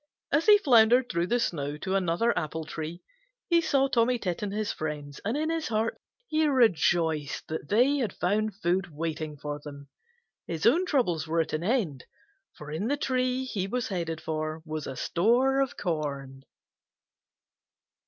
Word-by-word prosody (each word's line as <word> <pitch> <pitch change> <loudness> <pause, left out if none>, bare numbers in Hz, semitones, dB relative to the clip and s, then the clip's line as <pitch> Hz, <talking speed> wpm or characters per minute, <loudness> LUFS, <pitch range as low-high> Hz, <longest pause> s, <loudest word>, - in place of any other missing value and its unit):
As 295 +7 +2
he 420 -1 +9
floundered 245 - +5
through 170 0 0
the 240 +4 +1
snow 145 -9 -2
to 190 +5 -3
another 195 +5 +1
apple 160 0 -3
tree 160 +3 -6 0.5
he 340 0 +5
saw 275 -4 +2
Tommy 245 -1 +2
Tit 180 -6 -3
and 205 -1 -2
his 210 0 -2
friends, 150 -2 -5
and 220 +7 -1
in 315 +2 0
his 330 -1 -2
heart 225 0 -1 0.3
he 310 -3 +2
rejoiced 170 - +2
that 155 -2 -5
they 255 +7 +4
had 235 -8 -1
found 210 +3 -1
food 185 0 0
waiting 155 -1 -4
for 145 +1 -5
them. 140 -1 -10 0.6
His 165 -2 -3
own 340 +10 +4
troubles 175 - +1
were 165 +1 +2
at 160 - -4
an 155 +2 -1
end, 190 - -1 0.5
for 150 0 -9
in 170 +8 -2
the 285 +3 0
tree 255 -2 0
he 195 -7 -3
was 245 +4 -2
headed 165 -4 -3
for 155 0 -3
was 155 -1 -5
a - - -5
store 245 - +2
of 270 - -2
corn. 140 -6 -4
185 Hz, 170 wpm, -28 LUFS, 155-245 Hz, 0.6 s, he